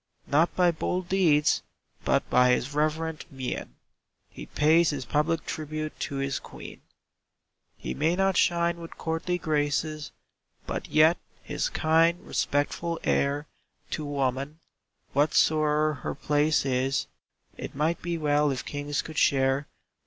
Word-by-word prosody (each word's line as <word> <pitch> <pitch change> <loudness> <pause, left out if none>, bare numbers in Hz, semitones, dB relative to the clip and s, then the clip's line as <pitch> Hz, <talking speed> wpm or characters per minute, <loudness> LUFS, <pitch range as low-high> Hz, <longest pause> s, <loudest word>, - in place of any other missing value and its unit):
Not 160 +4 +2
by 180 -1 +4
bold 175 +2 -3
deeds, 160 -6 +3 0.4
but - - +1
by 125 0 +4
his 130 +3 -1
reverent 155 +1 -1
mien, 130 - -5 0.6
He - - -9
pays 160 +3 +4
his 135 -4 -3
public 155 +4 0
tribute 155 -3 -5
to 140 - -3
his 135 0 -1
Queen. - - -11 1.0
He - - -5
may 160 +4 +1
not 195 0 +2
shine 170 -1 +2
with 165 -1 -10
courtly 165 +2 -2
graces, 155 -1 -1 0.5
But - - -4
yet, 155 +3 +5 0.2
his - - -2
kind, 165 - +3
respectful 165 +4 -1
air 140 +2 +1 0.5
To 155 - -3
woman, 140 +1 -2 0.5
whatsoe'er 150 0 +2
her - - -3
place 150 +1 +1
is, 135 +1 0 0.5
It - - -7
might 155 +4 0
be 170 0 -2
well 150 -1 +2
if 135 -2 -3
kings 145 0 -3
could 160 -2 -4
share. 135 +1 +2
150 Hz, 130 wpm, -27 LUFS, 145-165 Hz, 1.0 s, yet